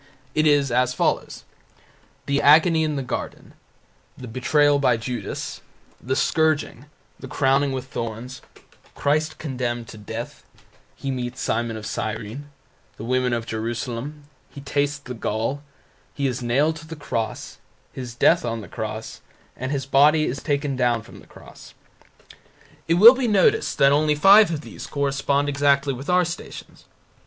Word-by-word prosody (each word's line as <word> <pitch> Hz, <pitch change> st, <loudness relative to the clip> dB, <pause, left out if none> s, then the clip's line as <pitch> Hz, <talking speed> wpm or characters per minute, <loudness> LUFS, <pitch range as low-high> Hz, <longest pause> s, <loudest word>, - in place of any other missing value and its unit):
It 155 Hz, 0 st, +2 dB
is 145 Hz, -3 st, +3 dB
as 125 Hz, +1 st, +1 dB
follows: -, -, -1 dB, 0.8 s
the 140 Hz, 0 st, 0 dB
Agony 160 Hz, +2 st, +5 dB
in 155 Hz, -1 st, -1 dB
the 135 Hz, -, -2 dB
Garden; 125 Hz, -, -6 dB, 0.6 s
the 125 Hz, -, -9 dB
betrayal 145 Hz, +4 st, +2 dB
by 125 Hz, -4 st, +3 dB
Judas; 120 Hz, -2 st, -5 dB, 0.4 s
the 130 Hz, +2 st, -2 dB
scourging; 155 Hz, -4 st, 0 dB, 0.3 s
the -, -, -8 dB
crowning 135 Hz, 0 st, +1 dB
with 130 Hz, -1 st, -4 dB
thorns; 115 Hz, +3 st, -6 dB, 0.5 s
Christ 155 Hz, +2 st, 0 dB
condemned 120 Hz, -5 st, -4 dB
to 110 Hz, -, -11 dB
death; 110 Hz, +3 st, -7 dB, 0.5 s
He 135 Hz, -, -4 dB
meets 125 Hz, 0 st, -4 dB
Simon 115 Hz, 0 st, -1 dB
of 110 Hz, -, -8 dB
Cyrene; 110 Hz, +7 st, -5 dB, 0.5 s
the -, -, -8 dB
women 125 Hz, +1 st, 0 dB
of 115 Hz, -1 st, -2 dB
Jerusalem; 120 Hz, +6 st, -5 dB, 0.3 s
He 140 Hz, -, -11 dB
tastes 145 Hz, +1 st, -1 dB
the 130 Hz, -3 st, -9 dB
gall; 115 Hz, +4 st, -2 dB, 0.5 s
He 140 Hz, -, -2 dB
is 125 Hz, -2 st, -1 dB
nailed 140 Hz, +7 st, +1 dB
to 160 Hz, 0 st, -12 dB
the 160 Hz, -, -7 dB
cross; 115 Hz, -7 st, -4 dB, 0.3 s
His 125 Hz, -2 st, -7 dB
death 165 Hz, +7 st, +4 dB
on 115 Hz, -2 st, -3 dB
the 100 Hz, -, -10 dB
cross; -, -, -6 dB, 0.3 s
andHis 135 Hz, +1 st, -3 dB
body 150 Hz, +3 st, +5 dB
is 135 Hz, +2 st, -3 dB
taken 145 Hz, -2 st, -1 dB
down 120 Hz, -3 st, +1 dB
from -, -, -14 dB
the -, -, -17 dB
cross. -, -, -15 dB, 1.1 s
It 165 Hz, -, +3 dB
will 220 Hz, +7 st, +10 dB
be 260 Hz, -2 st, -1 dB
noticed 420 Hz, -, +2 dB
that 140 Hz, 0 st, +5 dB
only 150 Hz, +1 st, +3 dB
five 195 Hz, +6 st, +7 dB
of 160 Hz, -3 st, -3 dB
these -, -, -9 dB
correspond 140 Hz, 0 st, 0 dB
exactly 140 Hz, -1 st, +2 dB
with 135 Hz, +5 st, -8 dB
our 180 Hz, 0 st, +4 dB
Stations. 170 Hz, +2 st, -8 dB
140 Hz, 150 wpm, -23 LUFS, 120-150 Hz, 1.1 s, will